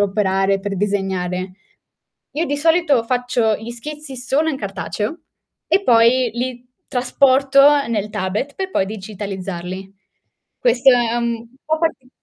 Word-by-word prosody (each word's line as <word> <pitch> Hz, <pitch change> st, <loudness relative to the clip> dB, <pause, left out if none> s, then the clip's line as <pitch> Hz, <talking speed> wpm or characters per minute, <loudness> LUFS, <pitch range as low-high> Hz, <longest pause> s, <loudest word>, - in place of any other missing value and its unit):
operare, 195 Hz, -1 st, +1 dB
per 200 Hz, 0 st, -4 dB
disegnare. 190 Hz, -2 st, -2 dB, 0.8 s
Io 315 Hz, +3 st, -1 dB
di 290 Hz, -3 st, -1 dB
solito 320 Hz, -4 st, +3 dB
faccio 245 Hz, -2 st, +1 dB
gli 225 Hz, +2 st, -8 dB
schizzi 275 Hz, +3 st, -7 dB
solo 270 Hz, +6 st, 0 dB
in 285 Hz, -, -3 dB
cartaceo 205 Hz, -, -4 dB, 0.5 s
e 395 Hz, -, +2 dB
poi 240 Hz, -3 st, +4 dB
li 245 Hz, 0 st, -4 dB, 0.2 s
trasporto 275 Hz, +2 st, +4 dB
nel 210 Hz, -2 st, -2 dB
tablet 205 Hz, +10 st, -3 dB
per 380 Hz, -1 st, -4 dB
poi 190 Hz, -, +1 dB
digitalizzarli. 195 Hz, -2 st, -6 dB, 0.6 s
Questo 270 Hz, -, +4 dB
è 240 Hz, -2 st, +2 dB
un 235 Hz, -1 st, -2 dB, 0.2 s
po' 315 Hz, +1 st, 0 dB
parti 265 Hz, -6 st, -2 dB
235 Hz, 130 wpm, -20 LUFS, 200-275 Hz, 0.8 s, poi